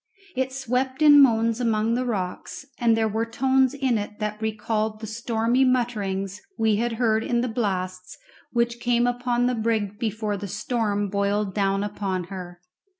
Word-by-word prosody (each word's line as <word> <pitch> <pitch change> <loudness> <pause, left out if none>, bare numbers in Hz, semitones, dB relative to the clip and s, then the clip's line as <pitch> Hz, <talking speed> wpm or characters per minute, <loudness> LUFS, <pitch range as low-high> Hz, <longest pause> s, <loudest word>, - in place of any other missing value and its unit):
It 260 0 -1
swept 260 +2 -1
in 290 -1 +9
moans 230 -2 +3
among 225 -1 +1
the 250 +1 -1
rocks, 195 +4 -4
and 230 -2 +3
there 220 -1 +2
were 220 +1 -1
tones 260 +3 +2
in 260 -5 +1
it 210 0 -6
that 210 0 -4
recalled 215 0 -1
the 220 - -6
stormy 230 +3 0
mutterings 210 -6 -1 0.2
we 220 -2 +2
had 235 +1 0
heard 225 -1 +1
in 240 0 0
the 250 - -1
blasts 185 -5 -3 0.3
which 235 0 0
came 240 0 +2
upon 245 0 0
the 250 - +2
brig 220 -3 -1
before 215 -2 -2
the 200 +1 -6
storm 210 0 -1
boiled 200 0 0
down 195 0 +1
upon 195 -3 -3
her. 175 -2 -8
225 Hz, 165 wpm, -24 LUFS, 205-245 Hz, 0.3 s, in